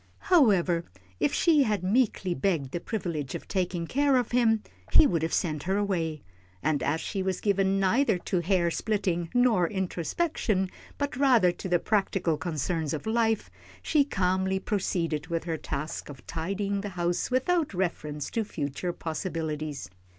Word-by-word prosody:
However, 190 - +4 0.4
if 145 - +2
she 320 -4 +4
had 210 -7 +1
meekly 195 -3 +1
begged 150 -5 0
the 175 - -2
privilege 170 - -3
of - - -7
taking 180 -3 -1
care 280 - +2
of 250 -3 +1
him, 225 -3 +3 0.3
he - - +7
would 165 -3 +1
have 160 - -1
sent 155 -4 0
her 195 - +2
away, 170 -7 -1 0.4
and 150 0 +1
as 155 +3 0
she 195 +3 -3
was 190 -1 -1
given 195 -1 +2
neither 215 +3 +3
to 180 +1 -1
hair 175 -1 +1
splitting 180 -5 -1
nor 235 -8 +4
introspection, 190 - -1 0.3
but 285 -2 -2
rather 250 -9 +4
to 180 +2 -7
the 175 - +4
practical 190 -4 +1
concerns 160 -1 -2
of 150 - -7
life, 225 -1 +1 0.3
she 300 -2 +3
calmly 190 -5 0
proceeded 170 -6 -1
with 170 -2 -2
her 165 -1 -2
task 150 +1 -5
of 140 -3 -11
tidying 195 +4 -2
the 205 - -4
house 175 0 0
without 305 +6 +1
reference 150 -5 -2
to 225 - 0
future 175 -1 -3
possibilities. 155 - -4
185 Hz, 160 wpm, -28 LUFS, 165-215 Hz, 0.4 s, he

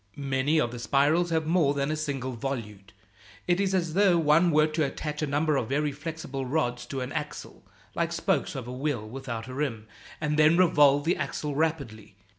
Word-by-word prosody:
Many 140 +2 0
of 120 -5 0
the 120 - -7
spirals 150 +8 +2
have 160 -1 0
more 160 -4 +2
than 140 +1 -1
a - - 0
single 140 -4 -3
volute. 110 -6 -6 0.6
It 175 +1 +2
is 195 -1 +1
as 170 -3 -1
though 190 -2 +4
one 165 +2 +4
were 155 -1 +4
to 155 0 -1
attach 150 +2 -4
a 150 - 0
number 145 +1 +1
of 120 -4 -2
very 145 +2 0
flexible 145 -2 -6
rods 125 -3 -1
to 135 -2 -4
an 125 - -4
axle, - - -6 0.3
like - - -1
spokes - - -1
of 130 -3 -5
a 125 - -6
wheel 130 -5 -2
without 120 -1 -6
a 130 - -7
rim 130 -6 -3 0.3
and 150 0 -1
then 155 +2 +5
revolve 145 -6 +5
the 170 +4 +1
axle 145 0 -3
rapidly. 140 -10 -2
145 Hz, 200 wpm, -27 LUFS, 130-155 Hz, 0.6 s, then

